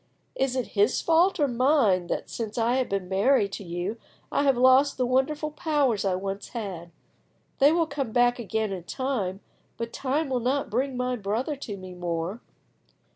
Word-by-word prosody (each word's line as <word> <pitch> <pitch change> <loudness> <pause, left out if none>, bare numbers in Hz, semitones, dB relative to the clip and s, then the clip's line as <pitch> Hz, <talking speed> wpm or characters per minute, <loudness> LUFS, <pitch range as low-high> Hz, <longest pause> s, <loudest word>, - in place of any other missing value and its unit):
Is 265 -1 0
it 255 -2 -2
his 210 +4 +2
fault 335 +3 +3
or 290 - +3
mine 240 - +2
that, - - -3
since 220 -1 -5
I 235 +2 +2
have 260 - 0
been 195 -2 -2
married 200 +3 +2
to 200 - -6
you, 175 +5 -4 0.3
I - - +2
have 270 -3 +3
lost 260 +3 +5
the 255 - +1
wonderful 290 +5 0
powers 295 - +1
I 190 -2 +1
once 195 +1 -4
had? 185 -6 -5 0.7
They 280 +2 +6
will 335 0 +2
come 275 -6 -4
back 245 +1 +3
again 220 -1 -2
in 180 -3 -5
time, 210 -7 -2 0.4
but 230 0 -5
time 285 +4 -1
will 255 -1 0
not 260 +3 -1
bring 255 +3 -1
my 250 0 0
brother 225 +8 -2
to 210 -7 -6
me 185 -1 -9
more." 175 +4 -3
240 Hz, 185 wpm, -26 LUFS, 195-270 Hz, 0.7 s, They